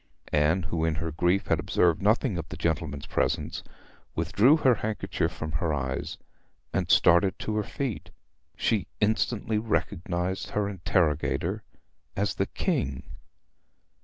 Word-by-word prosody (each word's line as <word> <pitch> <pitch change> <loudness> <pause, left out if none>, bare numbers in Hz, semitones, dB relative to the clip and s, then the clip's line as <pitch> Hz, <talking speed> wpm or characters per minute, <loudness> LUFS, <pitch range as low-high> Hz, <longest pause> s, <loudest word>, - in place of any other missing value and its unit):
Anne, 75 +5 +3
who 80 -1 -2
in 80 -1 +1
her 80 +1 -3
grief 90 +5 +1
had - - +1
observed 85 -1 +2
nothing 110 +2 +2
of 85 - -5
the - - -7
gentlemen's 75 -4 -2
presence, - - -1 0.5
withdrew 100 - +4
her 130 -5 +4
handkerchief 110 -1 -2
from 80 0 -5
her 80 +2 0
eyes 65 -3 -3 0.6
and - - 0
started 95 +3 +5
to 110 - -3
her 105 - +2
feet. 135 -1 -4 0.5
She 105 -5 +1
instantly 110 0 +1
recognised 95 -4 -2
her 105 -1 0
interrogator 85 -5 0 0.5
as - - 0
the - - -1
King. 65 -1 -1
90 Hz, 135 wpm, -27 LUFS, 80-105 Hz, 0.6 s, started